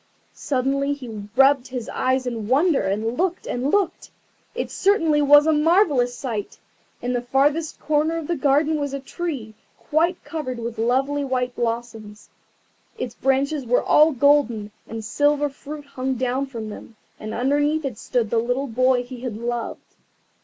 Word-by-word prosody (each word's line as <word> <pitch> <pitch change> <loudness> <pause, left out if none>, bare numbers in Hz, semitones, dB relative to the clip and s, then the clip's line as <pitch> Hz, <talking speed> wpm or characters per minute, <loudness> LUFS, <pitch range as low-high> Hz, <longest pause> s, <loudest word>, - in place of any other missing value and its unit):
Suddenly 275 +1 0
he 225 -7 -8
rubbed 270 0 +4
his 250 -3 -5
eyes 260 0 0
in 230 -4 -4
wonder, 290 +5 +3
and 215 +4 -1
looked 365 0 0
and 250 +3 -2
looked. 390 -1 0 0.5
It - - -3
certainly 330 -7 +2
was 290 +1 +7
a 315 - +3
marvellous 300 -6 +3
sight. 220 -6 -4 0.5
In 245 +1 -1
the 245 - 0
farthest 285 +6 +1
corner 305 +2 +1
of 325 - -4
the 345 - -1
garden 295 +2 +2
was 285 -1 -2
a - - -4
tree 270 -6 -5 0.2
quite 335 +4 0
covered 285 -6 -5
with 235 -1 -5
lovely 270 +5 +1
white 255 -2 -1
blossoms. 230 -3 -4 0.7
Its - - -4
branches 275 +2 0
were 245 - +2
all 305 +2 +5
golden, 255 -6 +2 0.2
and 225 -1 -6
silver 290 +4 +2
fruit 290 +1 -9
hung 265 -1 -3
down 255 +2 -1
from 230 -5 -6
them, 220 +2 -10 0.2
and 215 +1 -6
underneath 290 +4 +1
it 245 -6 -4
stood 235 -4 -1
the 230 - +3
little 245 +4 -1
boy 255 0 +2
he 245 0 -9
had 245 -5 -4
loved. 235 0 -5
265 Hz, 160 wpm, -23 LUFS, 240-295 Hz, 0.7 s, was